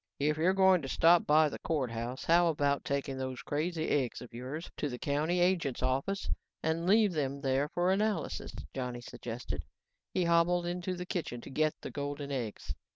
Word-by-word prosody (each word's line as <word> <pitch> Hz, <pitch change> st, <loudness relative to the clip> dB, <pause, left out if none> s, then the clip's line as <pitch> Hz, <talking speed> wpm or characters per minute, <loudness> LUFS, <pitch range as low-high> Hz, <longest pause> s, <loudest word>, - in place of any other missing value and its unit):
"If 150 Hz, +2 st, +1 dB
you're 180 Hz, +4 st, +3 dB
going 190 Hz, -2 st, +5 dB
to 135 Hz, -, -5 dB
stop 170 Hz, +5 st, +5 dB
by 155 Hz, +1 st, +6 dB
the 145 Hz, -, -6 dB
courthouse, 125 Hz, -5 st, -2 dB
how 170 Hz, +1 st, +5 dB
about 145 Hz, -3 st, +1 dB
taking 140 Hz, -1 st, -2 dB
those 130 Hz, -1 st, -4 dB
crazy 160 Hz, +2 st, -1 dB
eggs 130 Hz, -5 st, 0 dB
of 125 Hz, -1 st, -11 dB
yours 130 Hz, +8 st, -5 dB
into 150 Hz, -, -2 dB
the 125 Hz, -, -5 dB
county 150 Hz, +7 st, 0 dB
agent's 175 Hz, -8 st, +1 dB
office 135 Hz, +10 st, 0 dB, 0.4 s
and 160 Hz, +2 st, 0 dB
leave 210 Hz, -1 st, +5 dB
them 140 Hz, -3 st, -2 dB
there 135 Hz, +1 st, +1 dB
for 175 Hz, +3 st, +1 dB
analysis," 210 Hz, +2 st, -1 dB, 0.2 s
Johnny 125 Hz, -2 st, -4 dB
suggested. 120 Hz, 0 st, -6 dB, 0.5 s
He 185 Hz, -, +1 dB
hobbled 170 Hz, +1 st, +3 dB
into 180 Hz, +1 st, -2 dB
the 180 Hz, 0 st, -5 dB
kitchen 165 Hz, -9 st, -3 dB
to -, -, -10 dB
get 155 Hz, +3 st, +1 dB
the -, -, -6 dB
golden 145 Hz, 0 st, -4 dB
eggs. 120 Hz, -6 st, -4 dB
150 Hz, 180 wpm, -32 LUFS, 135-175 Hz, 0.5 s, by